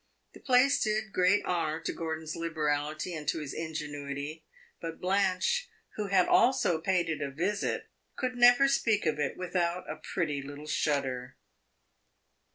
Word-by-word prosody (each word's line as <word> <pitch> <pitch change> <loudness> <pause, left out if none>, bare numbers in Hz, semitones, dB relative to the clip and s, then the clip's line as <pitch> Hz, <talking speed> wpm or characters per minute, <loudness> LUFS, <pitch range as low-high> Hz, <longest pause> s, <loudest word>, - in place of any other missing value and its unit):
The - - -13
place 260 +1 +4
did 215 -1 -1
great 185 +3 +3
honor 160 -3 -1
to - - -3
Gordon's 160 -1 -4
liberality 155 0 -2
and 155 -2 -6
to - - +1
his 150 -3 -5
ingenuity; 150 -1 -5 0.4
but 165 -1 -6
Blanche, 195 - +1 0.3
who 210 -1 -2
had 185 -2 +3
also 205 -9 +3
paid 180 -1 +1
it 155 -2 -2
a 140 - -2
visit, 185 +9 -1 0.3
could 255 -1 -2
never 245 +2 +6
speak 225 -7 +2
of 150 -1 0
it 145 -2 -1
without 180 -1 -1
a 155 - -4
pretty 155 -2 -2
little 145 +2 -9
shudder. 135 -4 -1
165 Hz, 150 wpm, -30 LUFS, 150-195 Hz, 0.4 s, never